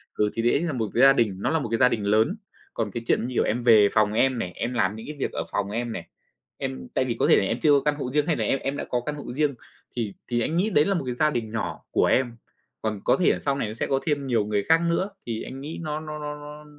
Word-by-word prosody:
Ừ, 105 0 +2
thì 115 - -1
đấy 120 +4 +3
là 170 -4 -1
một 110 -5 -2
cái 120 - +2
gia 135 0 +8
đình, 115 -7 +1
nó - - 0
là 160 - +1
một 130 - -4
cái 115 - +2
gia 125 +1 +5
đình 105 -4 -2
lớn. 110 - +2 0.4
Còn 110 -3 -2
cái 115 +3 -5
chuyện - - +2
như 125 - -6
kiểu - - +3
em 120 +3 -1
về 110 -4 +6
phòng 105 -1 +2
em 130 +2 +2
này, 90 -5 -3
em 120 +2 -3
làm 105 -3 +1
những 110 - -9
cái 150 - -6
việc - - -1
ở - - -3
phòng 100 -1 -1
em 115 +3 -3
này, - - -6 0.5
em 65 -1 -5
tại - - +1
vì - - -1
có - - +3
thể - - +7
là - - +2
em 115 +5 -1
chưa 150 - +4
có 140 -1 +5
căn 150 0 +2
hộ 130 -4 -4
riêng 150 +1 +2
hay 165 - +2
là - - -1
em 135 - +1
em 140 +1 -3
đã - - -4
có 120 -1 0
căn 150 - -2
hộ 145 - -7
riêng 145 0 +1 0.4
thì 110 -5 -2
thì 120 -1 0
anh 160 +8 -1
nghĩ 200 +5 +2
đấy 150 -7 +4
là 200 - +1
một 170 -7 -1
cái 125 -1 -3
gia 155 +3 +3
đình 120 -6 -3
nhỏ 110 0 -3
của - - +3
em. 120 -2 +1 0.4
Còn 105 -3 -2
có - - +4
thể 185 - +4
là - - -4
sau 140 -1 0
này 125 -6 -2
nó 105 - -5
sẽ 115 - -3
có 135 - +1
thêm 145 -3 -1
nhiều 115 -5 +1
người 105 -1 0
khác 165 +1 +6
nữa 170 +4 0 0.2
thì 115 -2 -3
anh 135 +1 -8
nghĩ 155 +4 -6
nó 155 -1 -3
nó 155 -1 -7
nó 150 0 -5
nó 150 +1 -10
125 Hz, 320 wpm, -25 LUFS, 110-150 Hz, 0.5 s, gia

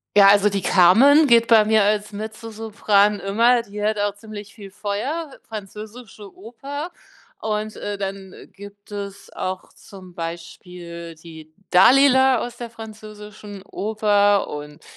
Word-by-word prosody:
Ja, 200 -1 +8
also, 205 +1 +5
die 200 -1 -2
Carmen 245 - +5
geht 235 -2 +4
bei 225 -2 +6
mir 215 -1 +3
als 210 +1 0
Mezzosopran 215 -1 -1
immer, 230 +5 +2
die 210 -2 -8
hat 215 0 0
auch 205 -1 -1
ziemlich 205 -1 -11
viel 200 -3 -12
Feuer, 255 - -4
französische 215 0 -10
Oper 275 - -8 0.5
und, 215 0 -3
äh, 205 -1 -6
dann 195 -1 -6 0.2
gibt 200 +1 -14
es 200 -1 -8
auch 185 0 -5
zum 185 -3 -15
Beispiel 170 0 -8
die 160 -1 -14 0.2
Dalila 260 +5 +5
aus 240 +1 -6
der 240 -2 -8
französischen 215 -2 -11
Oper 205 -1 +1
und 150 0 -9
205 Hz, 130 wpm, -21 LUFS, 195-220 Hz, 0.5 s, Ja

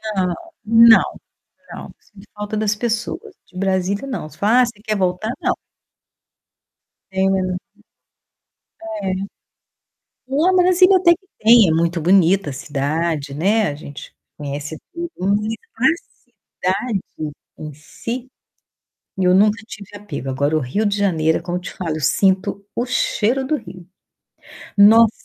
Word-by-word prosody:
Não, 185 -2 0 0.3
não, 230 +1 +7 0.7
não. - - -9
Sinto 210 0 -18
falta 210 +1 -5
das 210 -1 0
pessoas, 240 - -3
de 185 - -14
Brasília, 190 +4 -1
não. 200 - -5
Se - - -18
fala: 225 +5 +4
"Ah, - - +4
cê 230 -3 -9
quer 215 -2 -1
voltar?" 185 +3 -1
Não. - - +1 1.6
É. 190 -1 0 1.3
É. 220 - -10 1.4
Não, 325 +8 +2
Brasília 365 +1 +5
até 355 -2 +5
que 380 +2 -21
tem, 225 -2 +6
é - - +2
muito 170 +1 0
bonita 185 0 +3
a - - -5
cidade, 145 +2 -2
né, 200 +8 +2
a 145 - -4
gente 145 0 -11 0.2
conhece 145 +1 -6
tudo, 340 -1 -5 0.7
mas 315 +8 +2 0.7
a - - +4
cidade 210 0 -2 0.6
em 155 -1 -7
si, 235 - -7 0.9
eu 180 -1 +3
nunca 210 +3 +4
tive 205 -2 -11
apego, 205 -10 -6
agora, 140 +4 0
o - - +1
Rio 155 - -2
de 205 0 0
Janeiro, 160 -6 +1
é - - -7
como 175 0 -3
eu - - -6
te 180 - -7
falo, 160 -4 -4
sinto 190 +5 +1
o 240 - -1
cheiro 255 0 0
do 305 - 0
Rio. 190 - -10 0.9
Nossa, 220 +2 +7
200 Hz, 140 wpm, -20 LUFS, 170-230 Hz, 1.6 s, não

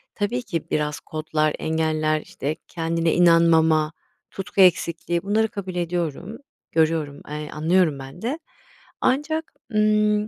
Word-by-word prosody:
Tabii 230 +4 -1
ki 170 -9 -4
biraz 150 -1 -1
kodlar, 155 -1 -1
engeller, 155 -1 0
işte, 150 +3 -4
kendine 165 0 0
inanmama, 165 -2 +4 0.4
tutku 195 0 -1
eksikliği 170 -1 +2
bunları 220 +2 +2
kabul 190 -3 -6
ediyorum, 175 +3 -3 0.3
görüyorum, 155 -3 +1
eee, 150 0 -5
anlıyorum 160 -1 +2
ben 135 +6 -10
de. 265 +8 -2 0.6
Ancak 295 +5 0 0.2
ımm, 210 0 +3
165 Hz, 115 wpm, -23 LUFS, 155-205 Hz, 0.6 s, inanmama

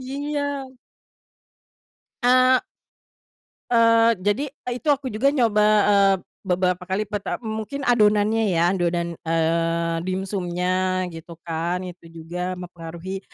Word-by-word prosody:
iya. 285 +3 -3 1.8
A 255 +1 +5 1.1
Eee, 230 -1 +5
jadi, 205 +7 +1
eee, 250 -3 -7
itu 310 - -11
aku 280 -3 +1
juga 220 +6 +1
nyoba, 230 -7 +3 0.3
eee, 200 -1 +5 0.3
beberapa 180 0 0
kali 190 +3 0
pertam 205 +3 -5
mungkin 220 +6 -4
adonannya 215 -2 +3
ya 175 -2 +2
adonan, 170 -2 -1
eee, 165 +1 +1
dimsumnya 185 -1 -1
gitu 165 +1 -10
kan 170 +2 -2
itu 180 -2 -10
juga 170 +3 -5
mempengaruhi 175 +1 -7
190 Hz, 110 wpm, -23 LUFS, 175-230 Hz, 1.8 s, A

